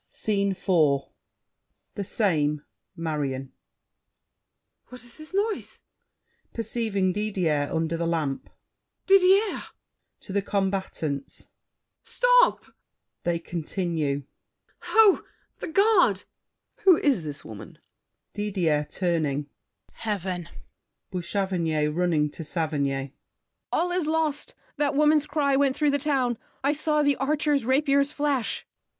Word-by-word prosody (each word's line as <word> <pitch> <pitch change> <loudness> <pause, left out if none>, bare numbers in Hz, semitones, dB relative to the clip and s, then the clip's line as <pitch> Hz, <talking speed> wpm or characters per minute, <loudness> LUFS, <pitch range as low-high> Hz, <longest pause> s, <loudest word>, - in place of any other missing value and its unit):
SCENE 200 -2 0
IV 160 -7 +2 0.9
The 200 - -4
same. 150 -8 0 0.3
Marion 140 -5 -3
MARION. - - -44 1.3
What 250 -2 -11
is 240 +4 -14
this 310 - -11
noise? 410 +2 -2 0.7
[Perceiving 220 -4 -1
Didier 180 -8 0
under 165 0 -1
the 170 0 -1
lamp. 155 -5 -2 0.6
Didier! 390 +2 +4 0.6
[To 190 - -7
the 200 - +2
combatants.] 190 -8 -3 0.5
Stop! - - +3 0.6
[They 175 -1 +1
continue.] 165 -4 -2 0.6
Ho! 440 -3 +5 0.4
The - - -5
guard! 360 - +4 0.6
SAVERNY. - - -28
Who 370 -4 +8
is 275 - +2
this 150 -2 -7
woman? 110 -2 -10 0.6
DIDIER 180 -8 0
(turning). 150 -6 -1 0.4
Heaven! 185 -5 -3 0.6
BOUCHAVANNES 175 -5 -1
(running, 165 -4 +1
to 165 - -7
Saverny). 140 -4 -2 0.6
All 355 +1 +1
is 355 -3 0
lost! 315 -2 -1 0.2
That 285 -2 +1
woman's 300 0 +4
cry 285 -3 +1
went 270 -1 +2
through 300 -2 +2
the 285 - +1
town. 260 -5 0 0.2
I 280 +2 +3
saw 300 0 +1
the 285 -1 +2
archers' 290 -1 +1
rapiers 280 +2 +2
flash. 285 -5 -1
200 Hz, 110 wpm, -26 LUFS, -, 1.3 s, Who